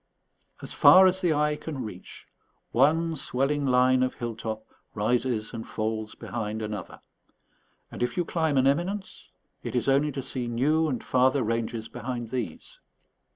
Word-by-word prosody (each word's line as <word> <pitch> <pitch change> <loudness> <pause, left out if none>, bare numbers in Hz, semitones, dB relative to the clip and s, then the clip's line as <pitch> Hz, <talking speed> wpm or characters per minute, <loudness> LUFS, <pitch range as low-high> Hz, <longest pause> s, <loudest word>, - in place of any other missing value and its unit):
As - - -3
far 190 +1 +8
as 185 0 +2
the 175 -3 +2
eye 150 0 +2
can 150 -3 -6
reach, 95 -4 -10 0.5
one 160 +6 +3
swelling 140 +1 -1
line 130 0 +4
of 130 0 0
hill 120 -2 -4
top 110 0 -5 0.3
rises 115 +1 0
and 115 -1 -6
falls 110 0 -3
behind 110 -1 -4
another; 105 -4 -6 0.9
and - - -8
if 120 - -1
you 175 - +1
climb 160 -4 0
an 130 - +4
eminence, 180 +8 -1 0.3
it - - -5
is 125 - 0
only 140 +2 +3
to 135 0 -4
see 125 -2 -4
new 150 +7 +2
and 130 -5 -3
farther 130 +2 +2
ranges 115 0 -2
behind 120 -3 -5
these. 115 -10 -5
130 Hz, 155 wpm, -27 LUFS, 115-150 Hz, 0.9 s, far